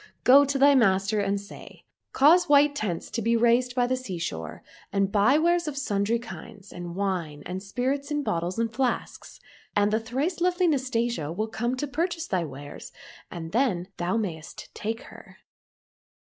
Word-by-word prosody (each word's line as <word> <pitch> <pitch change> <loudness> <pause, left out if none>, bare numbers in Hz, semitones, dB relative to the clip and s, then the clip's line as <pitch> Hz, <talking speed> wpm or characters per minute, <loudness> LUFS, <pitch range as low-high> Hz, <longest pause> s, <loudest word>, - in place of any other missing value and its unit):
Go 280 +3 +7
to 280 0 -1
thy 280 +1 +6
master 200 -4 +3
and 200 0 0
say, 200 +1 -13
' - - -58
Cause 315 +5 +5
white 290 0 +5
tents 205 -11 -4
to 230 - -2
be 230 +2 +2
raised 240 +2 +2
by 245 -1 +3
the 255 +1 0
sea 255 -9 -5
shore, 80 - -5 0.3
and 195 0 +1
buy 215 +8 +4
wares 345 +1 +2
of 290 -2 -4
sundry 210 -3 0
kinds, 205 -4 -11
and 175 -1 -7
wine 180 -7 -2
and 185 +2 -5
spirits 260 +8 -2
in 295 -1 -1
bottles 175 -4 -2
and 230 -1 -1
flasks,' 255 0 -3 0.4
and 205 +1 +2
the 220 - +3
thrice 270 +11 -2
lovely 360 0 +2
Nastasia 240 - -1
will 215 +6 -3
come 240 +3 -2
and 285 -2 -4
purchase 335 +1 -1
thy 185 - -1
wares, 145 -1 -9 0.4
and 165 -1 -7
then 200 -7 0
thou 175 +5 -1
mayst 165 -8 -6
take 225 +2 -4
her." - - -14
230 Hz, 175 wpm, -26 LUFS, 190-275 Hz, 0.4 s, Go